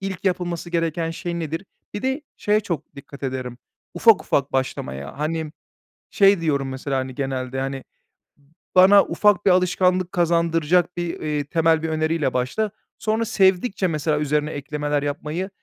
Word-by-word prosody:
ilk 195 Hz, 0 st, -5 dB
yapılması 175 Hz, -2 st, -2 dB
gereken 165 Hz, -1 st, -1 dB
şey 170 Hz, +1 st, -4 dB
nedir?" 165 Hz, +3 st, -4 dB, 0.3 s
Bir 205 Hz, -, -4 dB
de 265 Hz, +3 st, -1 dB
şeye 210 Hz, +1 st, +2 dB
çok 160 Hz, -7 st, -5 dB
dikkat 140 Hz, 0 st, -12 dB
ederim, 130 Hz, -2 st, -4 dB, 0.4 s
ufak 225 Hz, -4 st, +5 dB
ufak 140 Hz, 0 st, 0 dB
başlamaya. 70 Hz, -, -3 dB
Hani, 155 Hz, 0 st, -2 dB, 0.6 s
şey 195 Hz, -3 st, +4 dB
diyorum 140 Hz, -4 st, 0 dB
mesela, 135 Hz, +1 st, -3 dB
hani, 130 Hz, -1 st, -4 dB
genelde, 130 Hz, -1 st, -3 dB
hani, 135 Hz, 0 st, -3 dB, 0.9 s
"Bana 195 Hz, +2 st, +8 dB
ufak 205 Hz, -3 st, +2 dB
bir 190 Hz, -, +6 dB
alışkanlık 180 Hz, 0 st, +2 dB
kazandıracak 170 Hz, 0 st, +1 dB
bir, 175 Hz, -1 st, -3 dB
eee, 150 Hz, -2 st, -2 dB
temel 160 Hz, +1 st, +2 dB
bir 160 Hz, -, -1 dB
öneriyle 155 Hz, -3 st, 0 dB
başla." 160 Hz, +13 st, -1 dB, 0.3 s
Sonra 220 Hz, +1 st, 0 dB
sevdikçe 190 Hz, 0 st, +2 dB
mesela 155 Hz, -1 st, 0 dB
üzerine 150 Hz, +1 st, 0 dB
eklemeler 145 Hz, 0 st, -2 dB
yapmayı 155 Hz, +6 st, -3 dB
165 Hz, 145 wpm, -22 LUFS, 145-180 Hz, 0.9 s, Bana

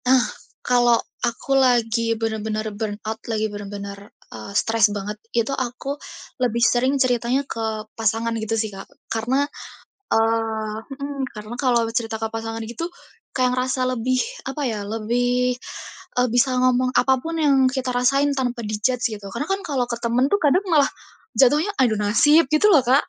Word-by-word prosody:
Nah, 255 Hz, -1 st, +5 dB, 0.4 s
kalau 240 Hz, -1 st, +4 dB, 0.2 s
aku 240 Hz, +3 st, -1 dB
lagi 230 Hz, -3 st, +3 dB
bener-bener 220 Hz, -1 st, -2 dB
burnout, 215 Hz, +1 st, -4 dB
lagi 220 Hz, -1 st, 0 dB
bener-bener, 200 Hz, 0 st, -7 dB, 0.2 s
eee, 200 Hz, -, -8 dB
stres 225 Hz, -2 st, +3 dB
banget, 205 Hz, +1 st, -4 dB, 0.2 s
itu 235 Hz, +3 st, +1 dB
aku 260 Hz, +2 st, -3 dB, 0.4 s
lebih 235 Hz, -1 st, +1 dB
sering 255 Hz, +4 st, +2 dB
ceritanya 255 Hz, +1 st, +1 dB
ke 220 Hz, -3 st, -3 dB
pasangan 225 Hz, +1 st, 0 dB
gitu 220 Hz, +1 st, -1 dB
sih 215 Hz, -2 st, -2 dB
Kak, 195 Hz, -, -9 dB, 0.2 s
karena, 245 Hz, +5 st, +1 dB, 0.7 s
eee 225 Hz, -1 st, +1 dB, 0.2 s
mhm 280 Hz, 0 st, -5 dB
karena 215 Hz, +2 st, -8 dB
kalau 245 Hz, -2 st, +2 dB
cerita 225 Hz, -2 st, -1 dB
ke 225 Hz, -, -2 dB
pasangan 225 Hz, 0 st, -4 dB
gitu, 240 Hz, +10 st, -5 dB, 0.4 s
kaya 250 Hz, -1 st, +1 dB
ngerasa 255 Hz, 0 st, 0 dB
lebih 255 Hz, 0 st, 0 dB, 0.3 s
apa 290 Hz, +2 st, -4 dB
ya, 220 Hz, -4 st, -2 dB
lebih, 245 Hz, +4 st, 0 dB, 0.6 s
eee, 250 Hz, 0 st, +3 dB
bisa 255 Hz, +1 st, +3 dB
ngomong 255 Hz, 0 st, +3 dB
apapun 270 Hz, +5 st, +1 dB
yang 295 Hz, -3 st, +4 dB, 0.2 s
kita 260 Hz, -1 st, -2 dB
rasain 275 Hz, +3 st, +2 dB
tanpa 245 Hz, -4 st, -2 dB
di-judge 215 Hz, +4 st, 0 dB
gitu. 205 Hz, -1 st, -9 dB
Karena 235 Hz, +8 st, -3 dB
kan 390 Hz, +2 st, -1 dB
kalo 270 Hz, -8 st, -1 dB
ke 240 Hz, -, -3 dB
temen 240 Hz, +2 st, +2 dB
tuh 405 Hz, +8 st, +2 dB
kadang 305 Hz, +6 st, +4 dB
malah 305 Hz, -6 st, +4 dB, 0.5 s
jatuhnya 295 Hz, +8 st, +4 dB
adu 240 Hz, -4 st, +4 dB
nasib 265 Hz, +9 st, +4 dB
gitu 310 Hz, +6 st, +4 dB
loh 300 Hz, -6 st, +6 dB
Kak. 255 Hz, +4 st, +3 dB
240 Hz, 155 wpm, -22 LUFS, 225-265 Hz, 0.7 s, loh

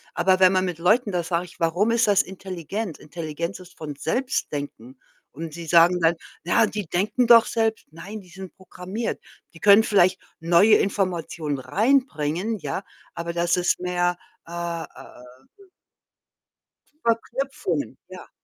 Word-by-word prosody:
aber 185 Hz, +1 st, +3 dB
wenn 185 Hz, -1 st, +6 dB
man 185 Hz, -1 st, +1 dB
mit 175 Hz, -3 st, -4 dB
Leuten 210 Hz, +6 st, +2 dB
da 175 Hz, -2 st, -1 dB
sage 170 Hz, +1 st, -1 dB
ich: 175 Hz, -, -17 dB
„Warum 175 Hz, +7 st, +1 dB
ist 230 Hz, -1 st, +2 dB
das 200 Hz, -1 st, +4 dB
intelligent?“ 190 Hz, 0 st, -6 dB
Intelligenz 170 Hz, +3 st, -6 dB
ist 180 Hz, -1 st, -15 dB
von 150 Hz, -2 st, -6 dB
Selbstdenken. 145 Hz, -, -3 dB, 0.3 s
Und 160 Hz, +2 st, -7 dB
sie 170 Hz, 0 st, -8 dB
sagen 170 Hz, +2 st, +5 dB
dann: 165 Hz, +1 st, +3 dB, 0.3 s
„Na 220 Hz, +6 st, +3 dB
die 210 Hz, -4 st, -5 dB
denken 210 Hz, +8 st, 0 dB
doch 230 Hz, -1 st, +8 dB
selbst.“ 225 Hz, -1 st, -1 dB
Nein, 190 Hz, +7 st, -8 dB
die 185 Hz, -, -17 dB
sind 190 Hz, +1 st, -10 dB
programmiert. 190 Hz, +4 st, -5 dB, 0.3 s
Die 160 Hz, -, -14 dB
können 205 Hz, +3 st, +7 dB
vielleicht 185 Hz, -3 st, +3 dB, 0.2 s
neue 175 Hz, +6 st, +5 dB
Informationen 170 Hz, -7 st, -2 dB
reinbringen, 205 Hz, -, 0 dB
ja, 195 Hz, 0 st, -4 dB, 0.3 s
aber 170 Hz, 0 st, -4 dB
das 170 Hz, 0 st, +1 dB
ist 180 Hz, -1 st, +1 dB
mehr 180 Hz, 0 st, 0 dB, 0.3 s
äh, -, -, -11 dB
äh, 170 Hz, -1 st, -4 dB, 0.7 s
w 395 Hz, -2 st, -20 dB, 1.4 s
Verknüpfungen, 230 Hz, -, -2 dB
ja. 185 Hz, -1 st, -11 dB
180 Hz, 145 wpm, -24 LUFS, 170-210 Hz, 1.4 s, doch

